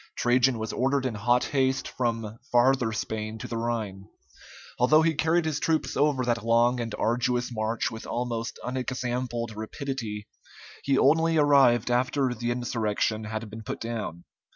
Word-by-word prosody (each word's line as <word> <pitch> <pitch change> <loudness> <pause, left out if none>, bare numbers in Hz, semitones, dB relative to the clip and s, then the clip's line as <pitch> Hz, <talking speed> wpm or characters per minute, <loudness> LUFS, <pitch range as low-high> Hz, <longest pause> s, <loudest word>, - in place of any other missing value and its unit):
Trajan 125 +1 +3
was 110 0 -4
ordered 135 +1 +1
in 130 - -1
hot 120 +4 +2
haste 130 -1 0
from 115 -3 -3
Farther 125 -1 +3
Spain 110 0 -4
to - - -7
the 115 - -5
Rhine. 110 -4 -3 0.7
Although 155 +6 +5
he 165 0 +3
carried 160 +3 +1
his 155 -2 -1
troops 160 -1 0
over 140 -3 +2
that 120 -3 0
long 120 +2 +3
and 115 -2 -3
arduous 125 +1 0
march 110 0 -1
with 110 0 -8
almost 120 -1 -3
unexampled 125 -2 -3
rapidity, 110 -2 -5 0.6
he 135 -1 +2
only 160 +4 +4
arrived 135 -5 +4
after 130 +1 +1
the 120 0 -3
insurrection 110 -3 -1
had 110 +1 -4
been 110 +1 -7
put 110 - -5
down. 110 -7 -5
120 Hz, 155 wpm, -27 LUFS, 115-130 Hz, 0.7 s, Although